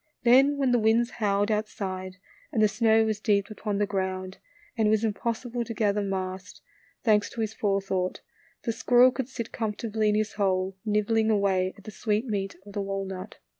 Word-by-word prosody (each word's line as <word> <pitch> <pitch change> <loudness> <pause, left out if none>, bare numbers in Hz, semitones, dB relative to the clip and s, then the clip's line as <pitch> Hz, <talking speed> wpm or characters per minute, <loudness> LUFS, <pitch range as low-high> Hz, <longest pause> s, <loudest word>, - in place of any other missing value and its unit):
Then 270 +4 +5
when 270 -3 +2
the 245 - +4
winds 225 +2 +3
howled 205 -1 0
outside, 190 -3 -3 0.3
and 225 - -1
the 215 - +6
snow 220 +1 +3
was 215 -1 -1
deep 205 -1 +1
upon 210 -1 -3
the 205 - +2
ground, 190 -1 -3 0.4
and 220 -3 +2
it - - +3
was 215 0 +2
impossible 235 +2 -2
to 230 0 -6
gather 210 -2 +1
mast, 190 0 -4 0.4
thanks 210 -2 +3
to 230 - -5
his 220 0 -2
fore 200 -2 0
thought 185 -1 -2 0.4
the 235 - 0
squirrel 245 +2 +5
could 255 0 -4
sit 235 -3 -6
comfortably 220 -1 -1
in 210 - +2
his 215 0 0
hole, 190 -1 0
nibbling 220 +1 +2
away 195 -3 +1
at 200 - -16
the 215 - -8
sweet 210 +2 -1
meat 200 -4 -3
of 205 - -11
the 205 - -2
walnut. 195 -1 -5
210 Hz, 190 wpm, -27 LUFS, 195-225 Hz, 0.4 s, the